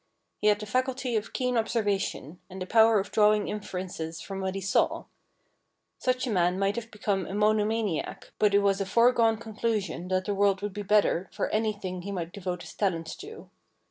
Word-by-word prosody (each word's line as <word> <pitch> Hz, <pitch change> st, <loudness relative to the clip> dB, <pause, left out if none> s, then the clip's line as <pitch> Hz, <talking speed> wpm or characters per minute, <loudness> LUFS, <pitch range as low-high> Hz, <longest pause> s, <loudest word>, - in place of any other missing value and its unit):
He 210 Hz, -, +1 dB
had 210 Hz, -1 st, +5 dB
the 210 Hz, -, -5 dB
faculty 255 Hz, +2 st, -1 dB
of 215 Hz, 0 st, -2 dB
keen 250 Hz, -1 st, -1 dB
observation, 205 Hz, -, -1 dB
and 190 Hz, +1 st, -8 dB
the 185 Hz, -, -3 dB
power 220 Hz, +1 st, +5 dB
of 195 Hz, -, -4 dB
drawing 210 Hz, -1 st, +4 dB
inferences 180 Hz, -5 st, -5 dB
from 195 Hz, +2 st, -6 dB
what 190 Hz, 0 st, -2 dB
he -, -, -2 dB
saw. 195 Hz, +1 st, +1 dB, 0.9 s
Such 255 Hz, 0 st, 0 dB
a 245 Hz, -, -2 dB
man 180 Hz, -2 st, +2 dB
might 205 Hz, +4 st, -1 dB
become 200 Hz, -3 st, -2 dB
a 190 Hz, -, -5 dB
mono 210 Hz, 0 st, +3 dB
maniac, 215 Hz, -6 st, -2 dB
but 205 Hz, -1 st, +4 dB
it 200 Hz, -, +4 dB
was 200 Hz, 0 st, +2 dB
a -, -, 0 dB
foregone 230 Hz, +1 st, +4 dB
conclusion 215 Hz, -5 st, -3 dB
that 185 Hz, 0 st, 0 dB
the 205 Hz, -, -1 dB
world 200 Hz, 0 st, +2 dB
would 205 Hz, -2 st, -3 dB
be 205 Hz, -, -4 dB
the 200 Hz, -, -10 dB
better 205 Hz, -3 st, +3 dB
for -, -, -2 dB
anything 205 Hz, -4 st, -2 dB
he 200 Hz, +3 st, -6 dB
might 175 Hz, -2 st, -4 dB
devote 180 Hz, -3 st, -4 dB
his -, -, -10 dB
talents 165 Hz, -6 st, -1 dB
to. 435 Hz, +2 st, -11 dB
205 Hz, 200 wpm, -28 LUFS, 190-220 Hz, 0.9 s, had